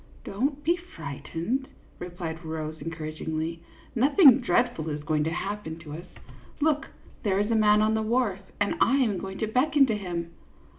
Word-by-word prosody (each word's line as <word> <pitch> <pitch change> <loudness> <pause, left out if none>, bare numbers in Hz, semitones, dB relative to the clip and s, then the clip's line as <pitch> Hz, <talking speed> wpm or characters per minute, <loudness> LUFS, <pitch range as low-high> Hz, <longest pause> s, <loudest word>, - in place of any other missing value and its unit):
" - - -24
Don't 275 +8 -2
be 340 +3 +3
frightened," 225 - -4 0.3
replied 175 -2 -6
Rose, 160 -1 -4
encourag 155 0 -6
ingly; 160 +1 -2 0.2
" - - -25
nothing 275 - +7
dreadful 235 - +1
is 150 -1 -4
going 150 0 +1
to - - +1
happen 185 -1 -4
to 160 -3 -10
us. 170 +3 -8 0.5
Look, 300 0 +1 0.3
there 195 -3 +1
is 205 +3 +1
a - - +3
man 210 -1 +5
on 215 +1 +2
the 220 - +1
wharf, 220 -3 +1 0.2
and 205 0 +1
I 265 - +5
am 225 -9 +2
going 195 0 -6
to 220 - -1
beckon 275 +5 +4
to 225 -4 0
him." 175 -4 -4
200 Hz, 185 wpm, -27 LUFS, 160-250 Hz, 0.5 s, nothing